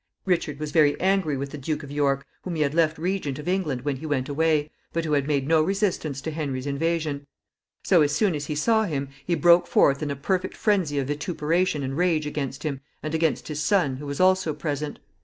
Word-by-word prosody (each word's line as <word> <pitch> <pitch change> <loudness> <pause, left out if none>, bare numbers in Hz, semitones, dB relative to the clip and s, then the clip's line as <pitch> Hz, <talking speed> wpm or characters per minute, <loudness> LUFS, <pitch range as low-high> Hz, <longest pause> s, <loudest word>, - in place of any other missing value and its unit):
Richard 170 -6 0
was 155 -1 -4
very 150 -2 +4
angry 190 -6 +1
with 140 +1 -4
the 150 - -7
Duke 150 +2 -3
of 140 - -9
York, 140 -1 +1 0.2
whom 180 -2 -5
he 155 - +2
had 140 0 -1
left 160 -1 +2
regent 170 -5 -2
of 150 - -8
England 175 -9 0
when 140 -1 -1
he 155 +4 -7
went 135 -3 -1
away, 155 0 +1 0.2
but 165 0 -1
who 155 - -1
had 140 -1 +1
made 140 -3 0
no 160 0 +4
resistance 175 -6 -1
to 160 - -4
Henry's 140 -4 -3
invasion. 145 0 -1 0.6
So, 180 -4 +4
as 145 -1 +3
soon 185 +6 +2
as 145 -1 -4
he 150 - -2
saw 220 +8 +2
him, 140 -6 -3
he 170 +3 0
broke 170 +3 +5
forth 140 +1 +3
in 150 - -2
a 140 - -2
perfect 185 +6 -2
phrensy 185 -9 +1
of 135 - -1
vituperation 155 +2 0
and 135 0 -3
rage 165 -2 +1
against 140 -3 -4
him, 140 -4 -3 0.2
and 155 0 -3
against 160 -1 0
his 150 -1 -3
son, 160 -9 +2
who 145 +1 -7
was 140 0 -4
also 185 -4 +3
present. 150 -1 -3
150 Hz, 225 wpm, -25 LUFS, 140-170 Hz, 0.6 s, broke